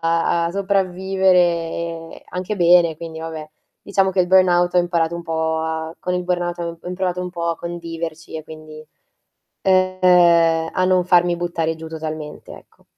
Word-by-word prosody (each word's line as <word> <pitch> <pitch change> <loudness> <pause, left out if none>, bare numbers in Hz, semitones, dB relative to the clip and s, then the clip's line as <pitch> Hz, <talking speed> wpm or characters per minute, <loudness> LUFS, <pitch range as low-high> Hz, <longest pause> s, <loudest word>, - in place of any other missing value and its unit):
a 165 +1 +1
a - - -3
sopravvivere 180 -4 0
anche 185 +3 -4
bene. 175 -3 +4
Quindi 165 -1 -8
vabbè, 160 -1 -7 0.3
diciamo 195 -1 +1
che 185 - +2
il 180 - 0
burnout 180 -1 +4
ho 180 - +5
imparato 170 -1 0
un 170 - -7
po' 160 -1 -1
a 160 0 -4
con 180 - -3
il 180 - -1
burnout 175 -1 -2
ho 170 -1 -5
ho - - -14
imparato 180 0 -2
un 180 - -4
po' 170 -1 -3
a 165 - -1
conviverci 165 -2 -6
e 155 - -7
quindi, 155 0 -12 0.7
ehm, 180 -3 +3
a 185 - +1
non 185 -1 +2
farmi 175 -1 +3
buttare 170 -2 -2
giù 160 0 -9
totalmente 155 -1 -7
ecco. - - -16
170 Hz, 165 wpm, -20 LUFS, 165-180 Hz, 0.7 s, ho